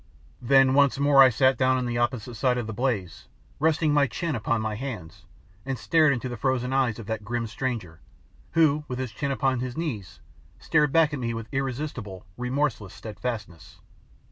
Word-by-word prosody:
Then 135 +1 +5
once 140 -1 +4
more 140 -1 +5
I 130 - +9
sat 130 +2 +2
down 130 0 +3
on 125 - -1
the 120 0 -2
opposite 120 -1 -1
side 125 +2 +1
of 120 - -2
the 110 - -5
blaze, 100 - -2 0.3
resting 155 0 +2
my 145 -1 +4
chin 165 +4 -3
upon 115 0 0
my 110 0 -2
hands, 105 -9 -7 0.4
and 135 -1 -3
stared 155 +4 +3
into 130 -1 -2
the 120 -1 -5
frozen 130 +2 -1
eyes 130 -5 +1
of 115 - -8
that 110 0 -4
grim 120 +2 -2
stranger, 115 -8 -4 0.5
who, 155 -2 +3
with 125 - -4
his 130 -3 -4
chin 140 +6 -3
upon 135 -2 0
his 125 +1 -5
knees, 120 - -4 0.4
stared 150 -3 +2
back 160 -1 +4
at 145 - -3
me 115 -2 -2
with 115 -1 -6
irresistible, 130 -7 -4
remorseless 125 -5 -2
steadfastness. 105 -5 -6
125 Hz, 185 wpm, -26 LUFS, 110-140 Hz, 0.5 s, I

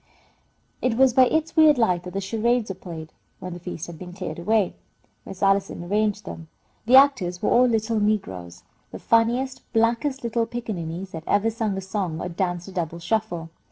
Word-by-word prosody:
It 250 -3 +1
was 265 -1 +5
by 255 +1 +6
its 315 +3 -1
weird 310 -3 +6
light 185 -7 +2
that 180 - -7
the 195 - -2
charades 225 +3 0
were - - -3
played, 165 -4 -9 0.3
when 180 -1 -6
the 175 - -8
feast 175 -2 -6
had 170 -2 -10
been 180 -1 -9
cleared 185 -2 -6
away. 210 +2 +1 0.5
Miss 190 - -7
Allison 195 -2 +1
arranged 210 +2 0
them. 165 -3 -8 0.4
The 250 - +6
actors 250 -11 +4
were - - +2
all 250 +1 +5
little 225 -1 0
negroes, 95 - -2 0.3
the - - -8
funniest, 240 +4 +1
blackest 235 +4 +1
little 235 0 0
pickaninnies 190 -6 -5
that 160 -1 -7
ever 210 +3 +2
sung 220 -3 -2
a - - -3
song 190 -4 -3
or 180 - -4
danced 175 0 -2
a - - -8
double 170 -3 -3
shuffle. 175 -3 -2
205 Hz, 190 wpm, -24 LUFS, 175-230 Hz, 0.5 s, by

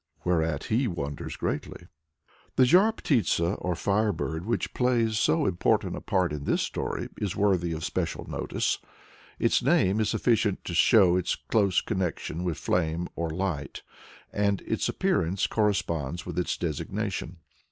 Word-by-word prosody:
Whereat 80 -4 0
he 120 +4 +1
wonders 70 -7 -4
greatly. 85 - -4 0.7
The 130 - +5
Zhar 185 - +5
Ptitsa, 100 - +1
or 90 -1 -1
Fire 105 +5 +1
Bird, 80 0 -4
which 115 - -1
plays 115 -3 +1
so 80 - +2
important 90 -2 +1
a - - -6
part 90 -5 0
in 70 -1 -5
this - - +1
story, - - -3
is 100 -4 -2
worthy 95 -4 +2
of 80 0 -3
special - - -3
notice. - - -1 0.6
Its - - +2
name 95 +4 +3
is 110 -1 +1
sufficient 110 -2 +1
to 90 - -4
show 90 0 +5
its 90 - 0
close 100 -5 +1
connection 90 -2 -3
with 85 -4 -2
flame 85 0 -1
or 85 -1 -2
light, 85 -2 -3 0.5
and 100 -1 +1
its - - -1
appearance 90 +4 +1
corresponds 85 -7 -1
with - - -3
its 90 - -1
designation. 90 +2 -3
90 Hz, 150 wpm, -27 LUFS, 85-105 Hz, 0.7 s, The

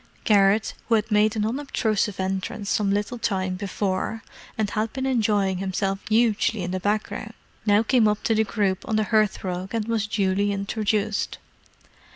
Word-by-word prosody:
Garrett, 205 0 +3 0.2
who 230 - +5
had 220 +1 -1
made 210 +1 +3
an 210 -1 0
unobtrusive 220 -5 -1
entrance 190 +2 -2
some 205 -2 +1
little 210 +4 -1
time 190 -4 -1
before, 195 +2 -2 0.3
and 215 -2 0
had 215 +1 -1
been 265 0 -3
enjoying 210 -7 +1
himself 195 0 -1
hugely 220 -2 +2
in 180 - -3
the 185 - -2
background, 215 +2 -2 0.3
now 205 +1 +5
came 230 -2 +3
up 210 0 0
to 225 - +2
the 220 0 +3
group 195 -2 0
on 220 - +1
the 215 - +2
hearthrug 195 -2 0
and 220 -1 -1
was 225 -2 0
duly 200 -1 +1
introduced. 205 +1 -1
210 Hz, 165 wpm, -24 LUFS, 195-220 Hz, 0.3 s, who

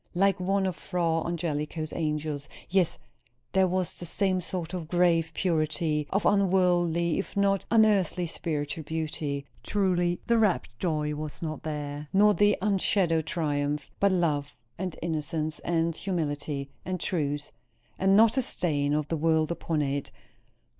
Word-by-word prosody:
Like 195 +1 +3
one 195 +1 +1
of 185 -3 -1
Fra 170 -3 0
Angelico's 155 -2 -3
angels! 150 -2 -2 0.2
Yes, 185 -3 +2 0.5
there 190 -1 +4
was 185 0 -1
the 175 - -7
same 185 +1 +1
sort 175 -1 -5
of 175 -4 -4
grave 170 -2 +3
purity, 155 -3 0
of 200 +2 0
unworldly 175 -4 +3
if 195 - -5
not 195 -1 +2
unearthly 205 -6 +3
spiritual 155 -2 -3
beauty. 150 -2 -3 0.2
Truly 175 -3 +1
the 235 -1 +3
rapt 205 - +2
joy 150 -4 0
was 150 +3 -6
not 155 -2 -4
there, 150 -1 -4
nor 210 +2 +6
the 205 0 +3
unshadowed 185 -5 +2
triumph; 145 -3 -1
but 200 0 +4
love, 150 -6 0 0.2
and 185 -2 -3
innocence, 155 -1 -2
and 165 -1 0
humility, 145 -6 -3
and 185 0 -3
truth; 145 -5 -2 0.5
and 195 +1 +4
not 225 +3 +5
a - - +4
stain 145 - 0
of 150 -1 -1
the 165 - -1
world 160 0 +2
upon 165 -2 -1
it. 140 0 -2
165 Hz, 145 wpm, -28 LUFS, 150-185 Hz, 0.5 s, nor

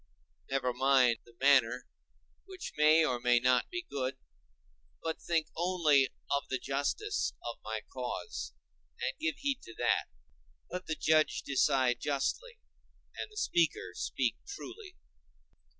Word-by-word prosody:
Never 135 -2 0
mind 130 -2 +4
the 120 - -19
manner, 130 -3 +4 0.6
which 380 -1 -8
may 155 +2 +6
or 125 -4 0
may 120 0 +4
not 125 0 +3
be 355 0 -4
good; 130 -1 -3 0.9
but 160 -1 -3
think 160 -2 0
only 160 -6 +3 0.2
of 140 0 0
the 130 - 0
justice 145 - -1
of - - -5
my - - -3
cause, 430 - -4 0.5
and 470 - -2
give 320 -1 -1
heed 280 -2 -1
to 115 - -12
that: - - +2 0.7
let 180 +1 -5
the 160 - -1
judge 155 -1 +2
decide 130 -3 +2
justly 435 - -2 0.6
and - - -5
the 425 - -14
speaker 170 - +1
speak 120 +6 -1
truly. 395 -1 -9
145 Hz, 135 wpm, -32 LUFS, -, 0.9 s, may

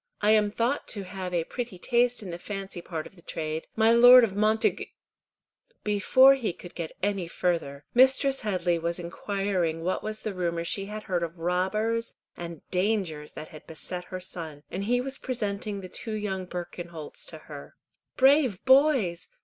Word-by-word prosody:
"I 210 +1 +3
am 210 -1 +4
thought 235 +6 -1
to 205 -3 -3
have 185 -1 -6
a 170 -2 +1
pretty 235 +1 -5
taste 240 +4 +1
in 185 - -6
the 170 - -6
fancy 195 -2 -6
part 160 -3 -5
of - - -13
the 170 - -17
trade. 155 -1 -4
My 220 0 +4
Lord 245 +2 +9
of 200 -4 0
Montagu—" 215 +2 +1 1.0
Before 215 +6 +6
he 240 -9 -2
could 175 +1 -12
get 165 -2 -5
any 195 -3 0
farther, 165 -5 -2
Mistress 265 +2 +4
Headley 180 -5 0
was 170 +1 -1
inquiring 175 -2 -2
what 185 +2 -1
was 215 0 -5
the 215 - -3
rumour 170 -2 -1
she 195 +3 -1
had 210 +1 -6
heard 180 -2 -1
of 170 +1 -4
robbers 210 +7 0 0.2
and 170 -2 -8
dangers 180 -6 -1
that 155 - -8
had 155 - -13
beset 180 +2 -6
her 185 - -6
son, 160 -5 -6
and 195 +2 -3
he 245 +3 +2
was 270 +1 -4
presenting 210 -4 -3
the 185 - -7
two 220 +4 -5
young 190 -3 -3
Birkenholts 175 -3 -7
to 160 - -6
her. 150 -2 -11 0.4
"Brave 265 -6 +4
boys! 260 - +4
195 Hz, 175 wpm, -27 LUFS, 170-220 Hz, 1.0 s, Lord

